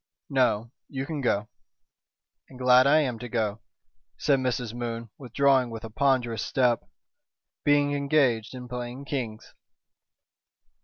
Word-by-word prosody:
"No. 115 -4 +2 0.2
You 135 -1 -4
can 150 -1 -4
go." 105 -4 0 1.0
"And 130 - -13
glad 125 +1 +5
I 155 +2 +5
am 125 -6 -2
to 125 - -7
go," 110 -2 -1 0.6
said 140 -3 +2
Mrs. 125 -3 -2
Moon, 115 -2 -5
withdrawing 135 0 +2
with 115 0 -7
a 110 - -7
ponderous 120 -3 +1
step, 125 -3 +1 0.7
"being 145 0 +3
engaged 140 -5 +1
in 125 -1 -8
playing 125 +2 -6
kings." 120 -7 -5
125 Hz, 125 wpm, -27 LUFS, 115-140 Hz, 1.0 s, glad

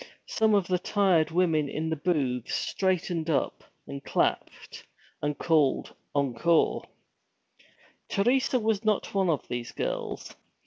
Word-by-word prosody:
Some 220 -1 +2
of 200 -3 +2
the 180 -1 0
tired 185 -5 +2
women 165 -4 +1
in 160 +3 -3
the - - +1
booths 140 -7 -1
straightened 180 -3 -1
up 155 - 0 0.2
and 140 0 -7
clapped, - - -2 0.4
and 145 0 -1
called, 155 -5 +2 0.2
'Encore!' 140 +4 +2 1.2
Teresa 250 +5 +2
was 220 -2 0
not 215 -2 0
one 195 -2 +2
of 155 -4 -1
these 120 -1 -4
girls. - - -4
170 Hz, 125 wpm, -28 LUFS, 145-195 Hz, 1.2 s, Some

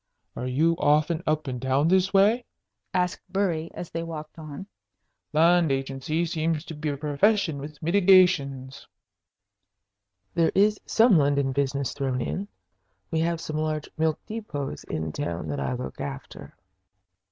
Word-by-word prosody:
"Are 125 - -4
you 155 +6 +2
often 155 +2 +2
up 155 -1 0
in 125 -2 -3
town 130 +4 +1
this 190 +1 +3
way?" 210 +5 +4 0.5
asked 180 -1 0
Bury, 180 -4 -1
as 175 - -7
they 165 - -3
walked 160 -1 -7
on. 155 +4 -8 0.7
"Land 165 0 +4
agency 135 +5 -1
seems 160 -1 -1
to - - -7
be 150 0 -3
a 140 - -3
profession 155 +3 +1
with 150 +1 -8
mitigations." 170 -8 +3 1.5
"There 165 -1 +2
is 210 +1 +3
some 220 -6 +5
London 140 -1 +2
business 140 0 -1
thrown 135 -2 -2
in. 190 +10 -3 0.6
We 160 - +1
have 165 0 0
some 155 -1 -4
large 155 -1 -2
milk 160 -1 0
depots 150 - -5
in 80 0 -3
town 85 0 -4
that 70 -1 -2
I 70 - -1
look 125 +1 -6
after." 135 0 -7
155 Hz, 145 wpm, -26 LUFS, 140-175 Hz, 1.5 s, some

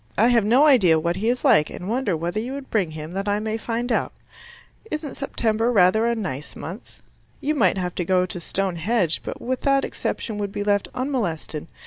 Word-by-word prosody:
I 230 +4 +5
have 235 -3 +4
no 245 +8 +5
idea 200 - +5
what 170 +2 -1
he 220 +4 0
is 250 +4 -1
like, 215 - +5
and 180 - -7
wonder 220 -6 0
whether 175 +6 -2
you 245 +4 -4
would 275 -1 -8
bring 195 -7 +1
him 155 +1 -7
that 195 +2 -3
I 205 0 +1
may 220 0 -2
find 235 +2 -3
out. - - 0 0.8
Isn't 305 -4 -4
September 230 -4 0
rather 215 +2 +4
a 235 - +1
nice 150 - -5
month? 185 +8 -9 0.4
You 300 - 0
might 200 - +2
have 180 -1 -2
to 180 - -2
go 180 +1 +2
to 180 0 -6
Stone 185 +1 -2
Henge, 185 -1 +2
but - - -6
with 255 +1 -3
that 275 -1 +2
exception 215 -3 -4
would 200 -1 -2
be 205 - -3
left 205 -1 +1
unmolested. 200 - -2
210 Hz, 210 wpm, -23 LUFS, 180-245 Hz, 0.8 s, I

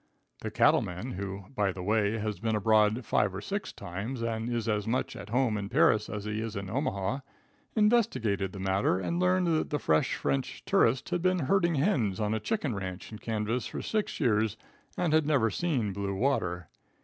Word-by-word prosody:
The - - -4
cattle - - +4
man, 90 +9 -5
who, 100 -1 -5
by 100 -4 +2
the 90 0 -7
way, 105 +2 +1
has 105 -1 -3
been 110 0 0
abroad 110 +2 +3
five 100 -3 +1
or - - -3
six 200 - -4
times 110 +8 -5
and 115 0 -2
is 120 -1 -1
as 105 -2 0
much 125 +3 -1
at 105 - -8
home 120 -3 +1
in 100 0 -5
Paris 105 0 +3
as 105 -1 -5
he 105 +1 -2
is 115 -1 -4
in 100 -1 -5
Omaha, 115 -2 -1 0.6
investigated 210 - +2
the 100 - -8
matter, 95 -1 +1
and 170 - -2
learned 185 0 +3
that 155 - 0
the 150 - 0
fresh 80 - +2
French 70 -1 -2
tourist 120 +3 +2
had 175 -1 -1
been 185 +1 +2
herding 170 +2 +2
hens 130 - +1
on 105 0 0
a 110 - 0
chicken 180 - -1
ranch 95 -1 -6
in 110 - -8
Kansas 115 +2 -2
for - - -5
six 215 -1 -2
years, 110 -4 +2 0.4
and 170 -4 +1
had 155 -2 +3
never 130 -8 +3
seen 125 - -1
blue 100 0 -3
water. 90 - 0
110 Hz, 195 wpm, -29 LUFS, 100-135 Hz, 0.6 s, cattle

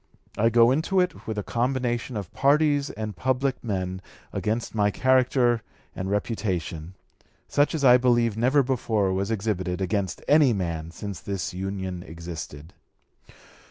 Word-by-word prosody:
I 115 +2 +3
go 115 +1 +5
into 160 +7 +1
it 180 0 -1
with 110 -1 -3
a 105 - -2
combination 120 0 -1
of 100 -5 -6
parties 145 0 +3
and 110 -2 -5
public 130 +3 -1
men 95 -4 -3 0.3
against 110 +2 -2
my 105 -2 +2
character 130 0 +2 0.3
and 95 +1 -4
reputation, 95 -5 -2 0.5
such 145 +3 +2
as 145 -3 0
I 125 -1 +8
believe 120 -3 +2
never 130 +5 +3
before 110 -6 0
was 95 +2 -1
exhibited 95 -5 -2
against 95 0 -2
any 145 -4 +5
man 85 -5 -3
since 100 +2 -7
this 100 -3 -4
Union 95 -1 -4
existed. 80 -3 -8
110 Hz, 140 wpm, -25 LUFS, 95-130 Hz, 0.5 s, I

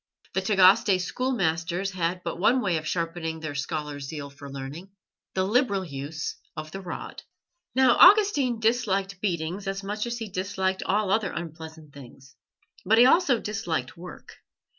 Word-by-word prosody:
The 190 - 0
Tagaste 190 0 +5
schoolmasters 185 -4 -1
had 180 0 -2
but 170 0 -4
one 240 +7 +4
way 185 -8 0
of 155 0 -5
sharpening 165 -1 -3
their 155 -2 -5
scholars' 145 -1 -4
zeal 145 -1 -7
for 140 0 -11
learning 140 +7 -7 0.5
the 185 - +2
liberal 200 -2 +1
use 145 +1 -5 0.2
of 155 0 -6
the 195 - -6
rod. 180 - -7 0.5
Now, 260 0 +5
Augustine 355 - +6
disliked 200 -5 0
beatings 180 +1 -2
as 195 0 -3
much 210 +3 -3
as 235 0 -3
he 225 -2 -5
disliked 190 0 -2
all 200 0 0
other 205 -2 +1
unpleasant 160 -2 -8
things, 135 0 -14 0.5
but 220 +4 +3
he 240 - +8
also 270 -3 +4
disliked 175 - -3
work. 175 +1 -11
185 Hz, 155 wpm, -26 LUFS, 160-210 Hz, 0.5 s, he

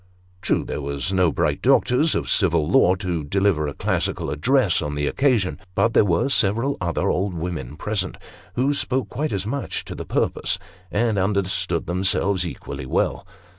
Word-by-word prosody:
True, - - +1
there - - -4
was 70 +6 -2
no 90 -3 +3
bright - - 0
doctor 125 - +3
of 155 +1 +1
civil 85 -6 +2
law 90 +1 +4
to 90 -4 -3
deliver 95 -1 +1
a 70 - -5
classical - - -1
address 120 - +2
on 75 -1 -3
the 75 0 -1
occasion; 120 - +1 0.2
but 115 +3 +2
there - - +5
were 90 +3 +1
several 115 +2 +2
other 85 -2 0
old 95 0 -1
women 80 -5 -5
present, 95 -1 -2 0.4
who 135 +4 +2
spoke 130 -5 -1
quite 150 +3 -2
as 100 -1 -2
much 135 +4 -3
to - - -7
the - - -6
purpose, - - 0 0.3
and 110 0 +1
understood 95 -1 0
themselves 95 +1 +1
equally 65 - -7
well. - - -1
95 Hz, 170 wpm, -23 LUFS, 85-115 Hz, 0.4 s, there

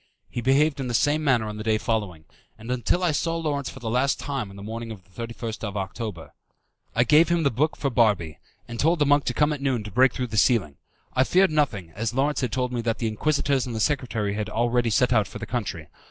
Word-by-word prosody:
He 120 - -3
behaved 140 +4 +3
in 135 - -2
the 120 - -1
same 150 +5 +2
manner 125 -6 +2
on 105 0 -5
the 105 - -5
day 110 -1 +2
following, 105 -9 -2 0.3
and 115 +3 -7
until 125 +8 0
I 175 - +3
saw 165 +2 -1
Lawrence 145 -4 -2
for - - -10
the 120 - -6
last 130 +3 +1
time 135 -7 -3
on 100 - -12
the 100 - -9
morning 115 +2 -6
of 105 -4 -9
the 100 +5 -7
31st 115 -2 -6
October. 95 -5 -5 0.6
I 120 - +4
gave 155 +5 +5
him 170 -1 +2
the 140 - +2
book 150 +7 0
for 140 - -1
Barbi, 105 - +1 0.3
and 120 0 -7
told 165 +4 +3
the 150 - +2
monk 145 0 +3
to - - 0
come 150 0 +3
at 145 - -6
noon 130 -5 0
to 105 - -8
break 130 +5 +4
through 125 - -3
the - - -1
ceiling. 100 - +2 0.4
I 130 - +4
feared 185 +5 +3
nothing, 115 - 0
as 110 +7 -3
Lawrence 145 +3 +1
had 125 -4 -1
told 125 -1 -1
me 120 - -1
that 115 -1 -1
the 115 - -1
Inquisitors 140 +3 0
and 120 - -5
the - - -2
secretary 110 -4 0
had 105 0 -3
already 120 +1 +1
set 125 +3 +3
out 110 -3 +3
for - - -8
the 110 - -6
country. 105 -10 -4
120 Hz, 250 wpm, -25 LUFS, 110-140 Hz, 0.6 s, gave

